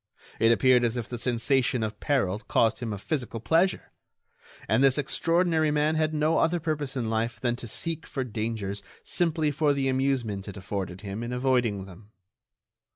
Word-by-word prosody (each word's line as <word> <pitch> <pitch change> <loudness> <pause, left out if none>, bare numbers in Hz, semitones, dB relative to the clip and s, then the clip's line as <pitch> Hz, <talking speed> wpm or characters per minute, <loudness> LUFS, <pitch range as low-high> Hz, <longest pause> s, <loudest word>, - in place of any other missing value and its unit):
It 115 0 +5
appeared 125 +1 +4
as 120 0 0
if 120 -1 -3
the 120 - -5
sensation 125 +1 +1
of 110 0 -4
peril 115 -9 0
caused 115 +1 +1
him 115 -3 -4
a 105 - -3
physical 120 - -3
pleasure; 165 - +1 0.8
and 110 +6 +3
this 135 0 +4
extraordinary 165 +2 +1
man 150 +1 +2
had 155 -1 +1
no 155 +1 +2
other 170 +2 +2
purpose 150 -4 -3
in 120 -3 -1
life 115 +1 -1
than 120 -1 0
to 120 - -8
seek 165 +8 -4
for 135 - -3
dangers 110 -4 -3 0.2
simply 160 -3 +1
for 145 0 +2
the 135 -1 0
amusement 130 -7 0
it 100 - -7
afforded 95 -1 -5
him 100 +1 -5
in 120 +1 -4
avoiding 125 -6 +1
them. 95 +2 -14
125 Hz, 175 wpm, -27 LUFS, 110-150 Hz, 0.8 s, It